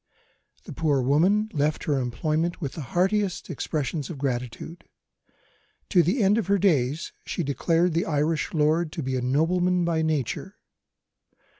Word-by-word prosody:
The -, -, -9 dB
poor 150 Hz, -4 st, +1 dB
woman 180 Hz, +11 st, +3 dB
left 150 Hz, +1 st, 0 dB
her 145 Hz, -3 st, 0 dB
employment 155 Hz, +8 st, -1 dB
with 140 Hz, -4 st, -4 dB
the 160 Hz, -, -6 dB
heartiest 185 Hz, -, 0 dB
expressions 150 Hz, -1 st, -3 dB
of 165 Hz, -, -6 dB
gratitude. 125 Hz, +4 st, -4 dB, 1.1 s
To 180 Hz, -, +5 dB
the 195 Hz, -, +1 dB
end 205 Hz, +3 st, +4 dB
of 215 Hz, -, -3 dB
her 200 Hz, 0 st, +3 dB
days, 155 Hz, -6 st, +1 dB
she 175 Hz, -, -3 dB
declared 165 Hz, +4 st, +1 dB
the 165 Hz, -, 0 dB
Irish 155 Hz, +4 st, 0 dB
lord 155 Hz, 0 st, +1 dB
to 160 Hz, -, -4 dB
be 130 Hz, 0 st, -2 dB
a 130 Hz, -, -1 dB
nobleman 175 Hz, +7 st, +1 dB
by 165 Hz, -1 st, +1 dB
nature. 160 Hz, -, -2 dB
160 Hz, 150 wpm, -25 LUFS, 140-180 Hz, 1.1 s, To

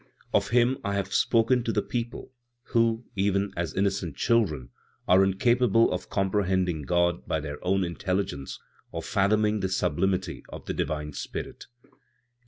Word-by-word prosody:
"Of -, -, +3 dB
Him 125 Hz, +3 st, +3 dB
I 100 Hz, 0 st, -1 dB
have 100 Hz, -1 st, -2 dB
spoken 120 Hz, +1 st, +3 dB
to 115 Hz, -, -1 dB
the 105 Hz, -, 0 dB
people, 120 Hz, 0 st, -4 dB, 0.4 s
who 115 Hz, 0 st, +2 dB
even 100 Hz, 0 st, +1 dB
as 85 Hz, -1 st, -3 dB
innocent 95 Hz, -6 st, 0 dB
children 85 Hz, -, +1 dB, 0.4 s
are 95 Hz, +2 st, +6 dB
incapable 115 Hz, +3 st, +3 dB
of 90 Hz, 0 st, -5 dB
comprehending 95 Hz, -4 st, 0 dB
God 85 Hz, +1 st, +1 dB
by 80 Hz, -, 0 dB
their 75 Hz, -1 st, -7 dB
own 95 Hz, +1 st, +2 dB
intelligence, 90 Hz, -5 st, -3 dB, 0.3 s
or -, -, -5 dB
fathoming 105 Hz, +2 st, +2 dB
the 95 Hz, -, -1 dB
sublimity 95 Hz, +1 st, 0 dB
of -, -, -9 dB
the -, -, -3 dB
divine 75 Hz, -1 st, -3 dB
Spirit; -, -, -6 dB, 0.2 s
8. -, -, -29 dB
95 Hz, 150 wpm, -27 LUFS, 90-110 Hz, 0.4 s, are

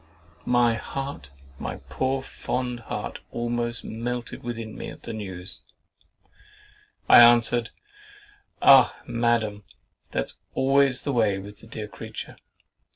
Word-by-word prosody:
My 120 Hz, -1 st, +4 dB
heart, 135 Hz, -, -5 dB, 0.3 s
my -, -, -4 dB
poor 130 Hz, 0 st, -1 dB
fond 125 Hz, -2 st, -3 dB
heart, 115 Hz, -, -5 dB
almost 120 Hz, 0 st, -2 dB
melted 120 Hz, +2 st, -4 dB
within 115 Hz, -2 st, -6 dB
me -, -, -6 dB
at -, -, -11 dB
this 115 Hz, -, -6 dB
news. 95 Hz, -3 st, -4 dB, 1.5 s
I -, -, +9 dB
answered, 120 Hz, 0 st, +5 dB, 0.9 s
"Ah! 135 Hz, -2 st, +7 dB
Madam, 115 Hz, -3 st, 0 dB, 0.5 s
that's -, -, -3 dB, 0.2 s
always 135 Hz, -1 st, +3 dB
the 140 Hz, -, -1 dB
way 110 Hz, -5 st, +2 dB
with 100 Hz, +1 st, -9 dB
the 110 Hz, -, -15 dB
dear 110 Hz, -2 st, -6 dB
creature. 110 Hz, +2 st, -8 dB
120 Hz, 115 wpm, -25 LUFS, 110-125 Hz, 1.5 s, I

